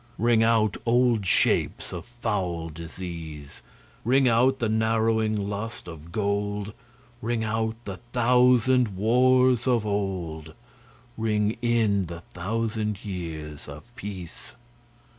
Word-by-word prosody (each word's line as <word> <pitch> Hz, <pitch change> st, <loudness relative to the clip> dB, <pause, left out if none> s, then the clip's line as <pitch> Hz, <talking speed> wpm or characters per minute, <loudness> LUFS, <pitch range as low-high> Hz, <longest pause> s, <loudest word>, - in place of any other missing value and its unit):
Ring 115 Hz, 0 st, +3 dB
out 110 Hz, -2 st, +3 dB
old 120 Hz, -4 st, +2 dB
shapes -, -, +1 dB
of -, -, -6 dB
foul 95 Hz, -9 st, -3 dB
disease, 80 Hz, -2 st, -8 dB, 0.4 s
Ring 130 Hz, +3 st, +4 dB
out 125 Hz, +3 st, +4 dB
the 115 Hz, -, 0 dB
narrowing 110 Hz, 0 st, +1 dB
lust 105 Hz, 0 st, -5 dB
of 80 Hz, -1 st, -10 dB
gold; 100 Hz, +1 st, -1 dB, 0.5 s
Ring 115 Hz, 0 st, -1 dB
out 110 Hz, 0 st, -1 dB
the 95 Hz, -2 st, -5 dB
thousand 125 Hz, -2 st, +3 dB
wars 125 Hz, +3 st, +4 dB
of 120 Hz, -4 st, +2 dB
old, 90 Hz, -6 st, -3 dB, 0.6 s
Ring 105 Hz, -1 st, +1 dB
in 110 Hz, -6 st, +2 dB
the 85 Hz, 0 st, -8 dB
thousand 105 Hz, +2 st, -2 dB
years 80 Hz, -6 st, -6 dB
of 90 Hz, +12 st, -12 dB
peace. 95 Hz, -6 st, -8 dB
110 Hz, 110 wpm, -26 LUFS, 90-115 Hz, 0.6 s, Ring